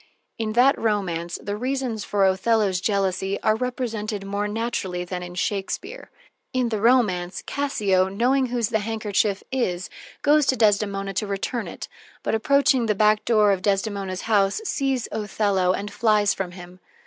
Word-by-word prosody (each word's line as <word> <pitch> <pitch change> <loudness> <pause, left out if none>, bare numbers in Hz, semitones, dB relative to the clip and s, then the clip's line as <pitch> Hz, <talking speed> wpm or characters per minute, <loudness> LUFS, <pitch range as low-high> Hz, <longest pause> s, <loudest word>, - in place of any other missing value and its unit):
In 215 -1 -2
that 260 +5 +4
romance 175 -6 -1
the 205 0 -3
reasons 250 -2 -2
for 200 -1 +1
Othello's 190 -1 +2
jealousy 195 -1 0
are 215 - +3
represented 225 -4 -3
more 200 +1 -2
naturally 205 -5 -3
than 180 0 -5
in 175 0 -8
Shakespeare. 210 - -3 0.4
In 255 -2 +1
the 215 -3 -2
romance, 205 -7 +2
Cassio, 205 -10 +1
knowing 255 +7 +1
whose 240 -3 -1
the 220 - +1
handkerchief 210 -2 -1
is, 190 -9 -2 0.3
goes 295 -1 +4
to 260 - +3
Desdemona 200 -3 +1
to 205 +3 -2
return 200 +4 -3
it, - - -7 0.4
but, - - -1
approaching 265 0 +3
the 210 - +1
back 215 +1 +3
door 215 -3 +4
of 190 -2 0
Desdemona's 195 -1 -1
house, 200 - +2
sees 270 - -1
Othello 205 -3 0
and 200 +2 -4
flies 210 -4 +3
from 180 -2 -4
him. 180 0 -12
210 Hz, 155 wpm, -24 LUFS, 195-235 Hz, 0.4 s, that